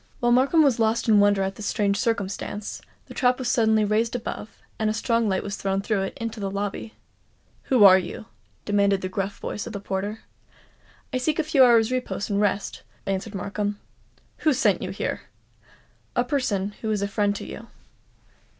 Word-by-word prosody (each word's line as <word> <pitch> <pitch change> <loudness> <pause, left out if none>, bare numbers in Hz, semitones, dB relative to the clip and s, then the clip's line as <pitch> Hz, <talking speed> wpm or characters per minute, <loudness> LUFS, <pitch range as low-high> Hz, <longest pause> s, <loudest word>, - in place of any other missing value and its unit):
While 240 0 +2
Markham 275 +6 +4
was 270 -5 +2
lost 225 +1 +1
in 215 -2 +6
wonder 205 -1 +4
at 190 0 -3
this 210 - -5
strange 200 -1 +1
circumstance, 205 -1 -3 0.2
the - - -11
trap 250 -2 +2
was 255 -2 -2
suddenly 220 -2 +3
raised 220 +3 +1
above, 225 -2 -6 0.2
and 215 -1 +1
a 215 - -1
strong 230 0 +1
light 190 -1 0
was 200 -1 -4
thrown 195 0 -1
through 205 -2 0
it 195 - -4
into 230 -1 -4
the 195 -1 -2
lobby. 200 +2 -4 0.7
"Who 250 -5 +4
are 190 -1 +9
you?" 180 +4 -7 0.4
demanded 200 -1 +2
the 185 - -3
gruff 195 +1 -3
voice 210 - -5
of 230 - -7
the 200 - -4
porter. 200 +2 -4 0.9
"I 255 - +1
seek 300 +4 0
a 320 - +1
few 295 -3 +4
hours' 235 -2 +5
repose 250 -5 -2
and 200 0 +1
rest," 200 -1 -1 0.2
answered 195 +2 -3
Markham. 205 +2 -3 0.6
"Who 310 - +2
sent - - +2
you - - -4
here?" - - -3 0.9
"A 245 - +3
person 245 -7 -1
who 220 - -2
is 210 -2 0
a - - 0
friend 205 0 0
to - - -6
you." - - -9
210 Hz, 190 wpm, -24 LUFS, 200-235 Hz, 0.9 s, are